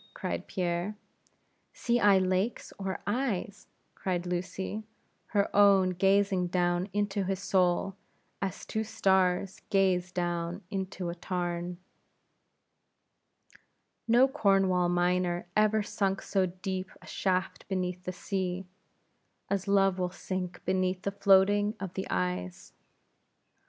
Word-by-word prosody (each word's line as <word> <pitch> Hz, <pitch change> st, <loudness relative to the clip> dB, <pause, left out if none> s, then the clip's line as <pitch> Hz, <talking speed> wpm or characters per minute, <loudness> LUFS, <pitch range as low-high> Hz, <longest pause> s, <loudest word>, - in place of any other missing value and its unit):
cried -, -, -4 dB
Pierre. 180 Hz, +2 st, -2 dB, 0.8 s
"See 240 Hz, 0 st, +1 dB
I 205 Hz, -3 st, +6 dB
lakes, 185 Hz, +4 st, 0 dB
or 190 Hz, -1 st, -3 dB
eyes?" 205 Hz, -4 st, -2 dB, 0.3 s
cried 180 Hz, -2 st, -2 dB
Lucy, 185 Hz, +4 st, -3 dB, 0.5 s
her 200 Hz, -2 st, 0 dB
own 200 Hz, -2 st, +6 dB
gazing 195 Hz, 0 st, +2 dB
down 175 Hz, +1 st, 0 dB
into 205 Hz, -1 st, 0 dB
his 190 Hz, 0 st, -1 dB
soul, 185 Hz, 0 st, +1 dB, 0.5 s
as 195 Hz, -1 st, -3 dB
two 220 Hz, -, -2 dB
stars 190 Hz, -3 st, +1 dB
gaze 185 Hz, -2 st, +2 dB
down 175 Hz, +1 st, -2 dB
into 190 Hz, -2 st, -3 dB
a -, -, -3 dB
tarn. 175 Hz, 0 st, -3 dB, 2.3 s
No 240 Hz, +3 st, +6 dB
Cornwall 195 Hz, -9 st, +2 dB
miner 175 Hz, 0 st, +1 dB
ever 215 Hz, 0 st, +3 dB
sunk 195 Hz, -1 st, -1 dB
so 190 Hz, -2 st, +1 dB
deep 185 Hz, +1 st, -4 dB
a -, -, -16 dB
shaft 185 Hz, -1 st, -1 dB
beneath 180 Hz, -1 st, -2 dB
the 185 Hz, -, -3 dB
sea, 185 Hz, 0 st, -3 dB, 0.9 s
as 200 Hz, 0 st, -1 dB
Love 195 Hz, -1 st, +3 dB
will 180 Hz, -1 st, 0 dB
sink 180 Hz, 0 st, -5 dB
beneath 185 Hz, 0 st, 0 dB
the 200 Hz, -, -1 dB
floatings 200 Hz, +2 st, +4 dB
of 190 Hz, -2 st, -5 dB
the 190 Hz, -, -4 dB
eyes. 90 Hz, -7 st, -3 dB
190 Hz, 115 wpm, -30 LUFS, 180-200 Hz, 2.3 s, I